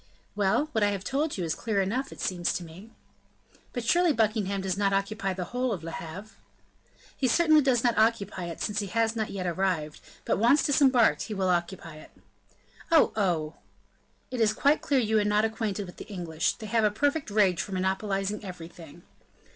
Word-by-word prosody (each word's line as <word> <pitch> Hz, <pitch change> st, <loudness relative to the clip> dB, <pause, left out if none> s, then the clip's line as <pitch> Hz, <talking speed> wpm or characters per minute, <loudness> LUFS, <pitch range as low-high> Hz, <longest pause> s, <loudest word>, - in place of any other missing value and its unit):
"Well, 210 Hz, +8 st, +1 dB
what 220 Hz, -6 st, +1 dB
I 205 Hz, -, +4 dB
have 200 Hz, -2 st, -3 dB
told 290 Hz, +4 st, -1 dB
you 180 Hz, -, -2 dB
is 160 Hz, -2 st, -1 dB
clear 215 Hz, +2 st, -2 dB
enough, 235 Hz, +8 st, -1 dB
it -, -, -11 dB
seems 175 Hz, -2 st, -1 dB
to 180 Hz, -, -4 dB
me." 175 Hz, +7 st, -12 dB, 0.8 s
"But 245 Hz, -, -4 dB
surely 350 Hz, +6 st, +4 dB
Buckingham 215 Hz, -4 st, 0 dB
does 190 Hz, -1 st, -1 dB
not 200 Hz, 0 st, +1 dB
occupy 195 Hz, 0 st, -1 dB
the 185 Hz, 0 st, -4 dB
whole 250 Hz, 0 st, 0 dB
of 180 Hz, -7 st, -4 dB
Le 165 Hz, -, -5 dB
Havre?" 175 Hz, +7 st, -8 dB, 0.8 s
"He 265 Hz, -, 0 dB
certainly 310 Hz, +3 st, +5 dB
does 260 Hz, -4 st, +2 dB
not 240 Hz, -3 st, +2 dB
occupy 210 Hz, -5 st, +1 dB
it, 170 Hz, -1 st, -7 dB
since 205 Hz, -1 st, -1 dB
he 205 Hz, -, -3 dB
has 225 Hz, +2 st, 0 dB
not 220 Hz, -2 st, -2 dB
yet 190 Hz, -2 st, -4 dB
arrived; 175 Hz, -4 st, -1 dB, 0.2 s
but, -, -, 0 dB
once 245 Hz, +7 st, +4 dB
disembarked, 265 Hz, -5 st, +4 dB
he 215 Hz, -, -5 dB
will 190 Hz, -1 st, 0 dB
occupy 170 Hz, -2 st, -2 dB
it." 155 Hz, -, -13 dB, 0.8 s
"Oh! 325 Hz, -, +5 dB
oh!" 170 Hz, -7 st, -1 dB, 0.7 s
"It 250 Hz, -2 st, -2 dB
is 215 Hz, -1 st, +3 dB
quite 285 Hz, +7 st, +2 dB
clear 280 Hz, -2 st, +1 dB
you 220 Hz, -2 st, +2 dB
are -, -, +2 dB
not 210 Hz, +1 st, +2 dB
acquainted 220 Hz, -3 st, -3 dB
with 180 Hz, -, -12 dB
the -, -, -9 dB
English; 170 Hz, -6 st, -2 dB
they 220 Hz, -, -10 dB
have 225 Hz, +1 st, +1 dB
a 210 Hz, -, +4 dB
perfect 285 Hz, +6 st, -1 dB
rage 200 Hz, -4 st, +2 dB
for 205 Hz, -, -7 dB
monopolizing 195 Hz, +2 st, -1 dB
everything." 170 Hz, -3 st, -10 dB
205 Hz, 195 wpm, -27 LUFS, 185-230 Hz, 0.8 s, certainly